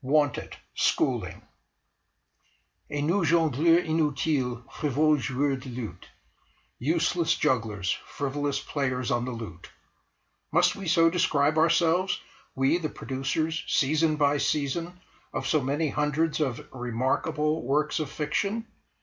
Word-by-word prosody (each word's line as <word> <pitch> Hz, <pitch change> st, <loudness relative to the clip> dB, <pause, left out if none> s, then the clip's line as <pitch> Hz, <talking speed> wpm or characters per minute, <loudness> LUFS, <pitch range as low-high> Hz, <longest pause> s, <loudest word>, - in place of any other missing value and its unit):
WANTED 145 Hz, 0 st, +1 dB, 0.2 s
SCHOOLING -, -, 0 dB, 1.5 s
"Et 145 Hz, -, -2 dB
nous 175 Hz, +5 st, +2 dB
jongleurs 165 Hz, +1 st, +3 dB
inutiles, 145 Hz, -5 st, 0 dB
frivoles 150 Hz, +1 st, +1 dB
joueurs 135 Hz, +1 st, 0 dB
de 130 Hz, -, -9 dB
luth!"... 115 Hz, -8 st, -7 dB, 0.7 s
Useless 165 Hz, +4 st, +1 dB
jugglers, 110 Hz, -9 st, 0 dB, 0.2 s
frivolous 145 Hz, 0 st, -2 dB
players 130 Hz, -4 st, -2 dB
on 120 Hz, 0 st, +1 dB
the 130 Hz, -, -4 dB
lute! 115 Hz, -8 st, -8 dB, 0.8 s
Must -, -, +3 dB
we 195 Hz, -2 st, -7 dB
so 165 Hz, 0 st, +4 dB
describe 155 Hz, -3 st, +2 dB
ourselves, 170 Hz, +3 st, +3 dB, 0.4 s
we, 135 Hz, +6 st, +2 dB
the 155 Hz, -3 st, -2 dB
producers, 140 Hz, +5 st, -2 dB
season 155 Hz, +3 st, +2 dB
by 145 Hz, -1 st, +2 dB
season, 165 Hz, +6 st, -1 dB, 0.3 s
of -, -, -3 dB
so 155 Hz, -, +2 dB
many 145 Hz, +4 st, 0 dB
hundreds 150 Hz, +3 st, 0 dB
of 135 Hz, -6 st, -2 dB
"remarkable" 130 Hz, +5 st, -1 dB
works 150 Hz, +5 st, +1 dB
of 155 Hz, -3 st, -3 dB
fiction? 200 Hz, +10 st, -2 dB
150 Hz, 115 wpm, -27 LUFS, 130-160 Hz, 1.5 s, so